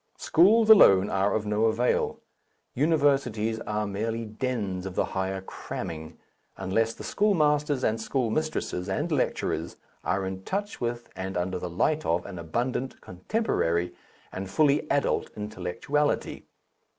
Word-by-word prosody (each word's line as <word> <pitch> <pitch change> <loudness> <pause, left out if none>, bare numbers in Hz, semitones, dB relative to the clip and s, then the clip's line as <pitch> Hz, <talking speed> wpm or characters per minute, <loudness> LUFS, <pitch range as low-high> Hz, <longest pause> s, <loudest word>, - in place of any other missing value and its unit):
Schools 215 +7 +4
alone 100 - +7
are 95 +1 +1
of 110 -1 -1
no 105 +1 +1
avail, 115 +2 +1 0.5
universities 135 -7 +1
are 105 0 -1
merely 110 +3 -3
dens 105 -5 -3
of 95 - -7
the - - +2
higher 95 0 -2
cramming, 80 -3 -7 0.4
unless 115 +4 0
the - - -9
schoolmasters 150 -8 +2
and 110 +1 +1
schoolmistresses 120 -6 -1
and 95 - -1
lecturers - - -1 0.3
are 95 0 0
in 95 0 -5
touch 205 - -3
with 120 0 -3
and 95 0 -4
under 90 +1 -1
the 90 - -4
light 150 - +1
of 85 +1 0
an 95 -3 -7
abundant, 120 +10 -2
contemporary, 90 - -1 0.4
and 95 0 -5
fully 145 +5 +2
adult 140 0 +1
intellectuality. 105 +9 -2
110 Hz, 130 wpm, -27 LUFS, 95-140 Hz, 0.5 s, alone